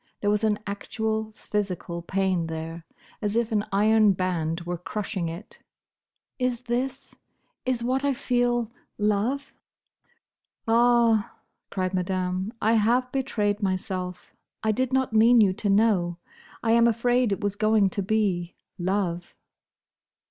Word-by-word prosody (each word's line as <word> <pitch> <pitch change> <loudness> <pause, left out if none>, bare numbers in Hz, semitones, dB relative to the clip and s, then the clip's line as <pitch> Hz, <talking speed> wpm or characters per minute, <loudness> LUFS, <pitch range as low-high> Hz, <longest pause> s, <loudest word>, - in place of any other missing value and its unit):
There 205 - +2
was 210 +1 0
an 215 -1 +2
actual 220 +2 -3
physical 185 -5 -3
pain 185 -1 0
there, 165 +1 -6 0.3
as 210 0 -1
if 235 0 +1
an 210 -2 +1
iron 210 +1 +4
band 175 -3 -1
were 175 0 -4
crushing 190 -2 -3
it. 170 +6 -9 0.8
"Is 250 -1 0
this—is 255 0 -5
what 260 +3 0
I 280 -1 +1
feel—love?" 240 0 -1 1.1
"Ah!" 230 -2 +3 0.3
cried 185 -1 -2
Madame, 185 +1 -1
"I 220 +2 +2
have 240 +3 +2
betrayed 220 -7 -1
myself. 185 -1 -3 0.3
I 220 - +2
did 255 +4 -1
not 260 -3 +1
mean 230 +2 +6
you 200 -4 +5
to 205 +2 -2
know. 195 -5 +2 0.5
I 225 - +2
am 235 0 +5
afraid 240 0 +2
it 195 - -1
was 205 -1 -1
going 215 -2 +3
to 200 - -2
be—love." 185 -2 -2
210 Hz, 125 wpm, -26 LUFS, 185-235 Hz, 1.1 s, mean